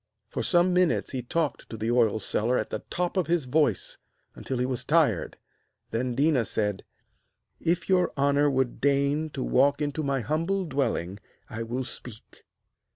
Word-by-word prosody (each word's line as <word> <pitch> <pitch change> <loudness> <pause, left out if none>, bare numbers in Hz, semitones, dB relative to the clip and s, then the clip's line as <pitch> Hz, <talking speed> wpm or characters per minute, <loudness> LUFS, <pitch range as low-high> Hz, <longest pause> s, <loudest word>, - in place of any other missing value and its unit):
For - - -3
some 180 0 +3
minutes 180 -2 +2
he 130 - -3
talked 150 +4 -2
to 115 - -6
the 110 +2 -1
oil 115 -3 +3
seller 115 +4 0
at - - -3
the - - -2
top 180 +2 -2
of 185 - +1
his 170 -4 +1
voice, 130 - 0 0.3
until 130 - -4
he 125 - +1
was 130 -2 -3
tired, - - +2 0.5
then 120 +2 -1
Déna 140 -4 +2
said: 105 -3 -1 0.8
'If 170 +1 0
your 180 -2 +3
honour 140 +1 +3
would 130 -2 -1
deign 140 +2 +2
to - - -4
walk 140 - +3
into 150 0 -2
my 140 -3 0
humble 165 +8 -1
dwelling, 130 - -1 0.3
I 115 -1 -5
will 120 +3 -3
speak.' 120 -2 -10
140 Hz, 165 wpm, -27 LUFS, 120-160 Hz, 0.8 s, some